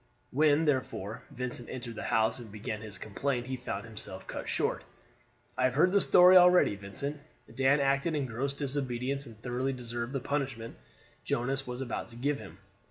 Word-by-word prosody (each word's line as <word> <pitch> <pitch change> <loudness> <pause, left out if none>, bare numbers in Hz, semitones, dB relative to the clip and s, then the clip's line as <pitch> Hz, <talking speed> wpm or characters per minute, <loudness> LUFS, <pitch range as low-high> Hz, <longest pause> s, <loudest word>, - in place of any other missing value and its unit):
When, 150 +2 +4
therefore, 125 -6 -1
Vincent 125 -1 -5
entered 120 -2 -6
the 110 - -6
house 110 +1 +1
and 115 -4 -10
began 105 +1 -5
his 105 -3 -7
complaint 120 +6 -2
he 130 +1 -3
found 115 -4 -5
himself 105 -4 -8
cut - - -6
short. - - 0 0.7
"I 130 - +2
have 130 0 +1
heard 175 +5 +5
the 200 0 +4
story 180 +1 +8
already, 180 - +6
Vincent. 120 +9 -5 0.3
Dan 135 +2 +4
acted 140 +3 +1
in 145 -2 0
gross 130 +3 -2
disobedience, 140 -1 -2
and 115 -2 -12
thoroughly 125 +4 -2
deserved 120 0 -5
the 135 - 0
punishment 135 -4 -3 0.5
Jonas 135 +2 -1
was 125 +1 -4
about 125 -3 -3
to 115 - -11
give 140 +4 -1
him. 80 - -11
130 Hz, 175 wpm, -30 LUFS, 115-140 Hz, 0.7 s, story